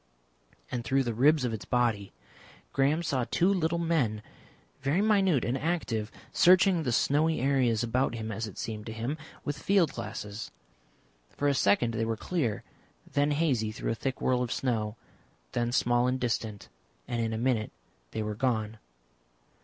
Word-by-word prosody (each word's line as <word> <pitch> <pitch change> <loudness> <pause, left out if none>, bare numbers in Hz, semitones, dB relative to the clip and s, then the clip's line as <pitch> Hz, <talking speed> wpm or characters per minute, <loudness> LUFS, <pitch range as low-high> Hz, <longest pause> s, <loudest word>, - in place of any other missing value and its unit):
And, 120 - -2
through 135 +4 +2
the 120 -2 -2
ribs 140 +4 +4
of 120 - -1
its 110 - -5
body, 115 -5 0 0.6
Graham 145 +5 +2
saw 130 -6 0
two 185 +3 +3
little 170 -2 0
men, 145 -11 0 0.6
very 145 +7 +1
minute 195 - +3
and 120 - 0
active, 135 -8 -2 0.2
searching 180 0 +5
the 130 -6 -1
snowy 155 +6 +2
areas 125 -4 +2
about 120 +1 0
him, 110 -1 -4
as 110 +2 -3
it 105 - -11
seemed 110 -1 -5
to 110 - -5
him, 115 +6 -3 0.3
with 145 -1 -3
field 190 -6 +3
glasses. 105 +2 -6 0.8
For 145 - -2
a 140 - +4
second 115 -1 +2
they 115 0 0
were 115 -1 -2
clear, 130 - -2 0.5
then 145 +1 +2
hazy 140 -8 +1
through 110 - -3
a - - +1
thick 130 +3 -3
whirl 125 -1 +2
of 120 -2 -2
snow, 110 -4 -1 0.6
then 120 0 0
small 120 0 +2
and 130 +1 0
distant, 115 -4 -2 0.4
and 120 -1 -1
in 115 -1 -1
a 110 - -2
minute 115 -2 0 0.4
they 110 - -3
were 105 0 -3
gone. 110 -2 -1
125 Hz, 170 wpm, -29 LUFS, 110-145 Hz, 0.8 s, searching